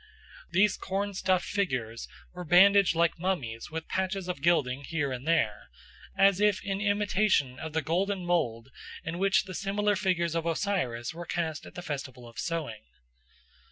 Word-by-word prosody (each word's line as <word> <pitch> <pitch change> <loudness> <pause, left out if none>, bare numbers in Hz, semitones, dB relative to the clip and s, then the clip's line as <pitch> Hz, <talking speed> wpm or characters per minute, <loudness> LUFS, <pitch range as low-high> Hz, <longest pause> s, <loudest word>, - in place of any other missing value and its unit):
These 205 +1 +3
corn 200 +1 -2
stuffed 185 -1 +1
figures 125 - -2 0.3
were 180 0 -6
bandaged 190 +2 +6
like 170 0 +2
mummies 140 -12 -2
with 160 +1 -5
patches 190 0 -2
of 180 -6 -4
gilding 140 -5 +2
here 145 -2 -2
and 130 +3 -6
there, 135 -11 +1 0.5
as 195 0 +4
if 210 -2 +3
in 195 0 -2
imitation 205 -9 +1
of 160 -1 -6
the 160 0 0
golden 185 +3 -1
mould 135 -9 0 0.3
in 165 +2 -4
which 195 0 +3
the 190 -2 -8
similar 205 +2 0
figures 180 -4 0
of 165 0 -1
Osiris 165 - -1
were 170 0 -8
cast 160 -3 -3
at - - -14
the 175 - -6
festival 135 -5 -6
of 115 - -11
sowing. 155 -11 -3
175 Hz, 160 wpm, -29 LUFS, 145-195 Hz, 0.5 s, bandaged